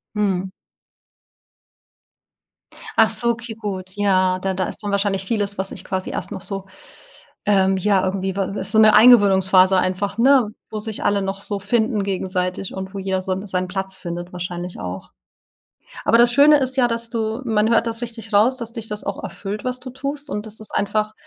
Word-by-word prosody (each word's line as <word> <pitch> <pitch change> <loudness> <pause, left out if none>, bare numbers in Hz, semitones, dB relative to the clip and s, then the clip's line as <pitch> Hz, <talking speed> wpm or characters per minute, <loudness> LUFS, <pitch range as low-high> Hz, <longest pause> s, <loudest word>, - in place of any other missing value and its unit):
Mhm. 190 -3 -1 2.5
Ach - - +6
so, 235 - +2
okay, 235 0 -3
gut, 195 -4 -5
ja, 185 -2 +2
da 190 +1 -2
da 185 0 -1
ist - - -6
dann 205 - -2
wahrscheinlich 200 -1 0
vieles, 205 -1 -1
was 190 +1 -2
sich - - -9
quasi 185 -1 -3
erst - - -4
noch - - -6
so, 195 +1 -4 0.8
ähm, 195 -2 +3
ja, 195 0 +2
irgendwie 190 0 -2
wa 195 +1 -2
so 220 - +2
'ne 215 -1 +7
Eingewöhnungsphase 195 -4 +6
einfach, 190 +2 -1
ne, 255 -2 +4 0.2
wo 215 - -4
sich 215 0 -5
alle 200 -1 +2
noch 195 0 -4
so 200 0 -3
finden 220 +1 0
gegenseitig 185 -1 -2
und 190 0 -6
wo 200 - -5
jeder 190 -1 -1
so 190 +1 -3
seinen 185 -2 -2
Platz 190 0 -4
findet 175 0 -6
wahrscheinlich 175 0 -6
auch. 90 -1 -7 0.9
Aber 230 - +4
das 240 0 +6
Schöne 290 +3 +7
ist 260 -1 -1
ja, 250 -2 +3
dass 230 0 -2
du 220 0 -2
man 220 -2 +1
hört 230 0 +3
das 230 +1 -3
richtig 225 -2 -6
raus, 230 +6 +4
dass 235 -2 -6
dich 225 -2 -6
das 210 0 -5
auch - - -4
erfüllt, 205 0 -6
was 250 0 -2
du 255 - -8
tust 280 +3 -5
und 210 -6 -4
das 215 +1 -8
ist 215 - -10
einfach 215 +1 0
205 Hz, 190 wpm, -21 LUFS, 190-225 Hz, 2.5 s, ne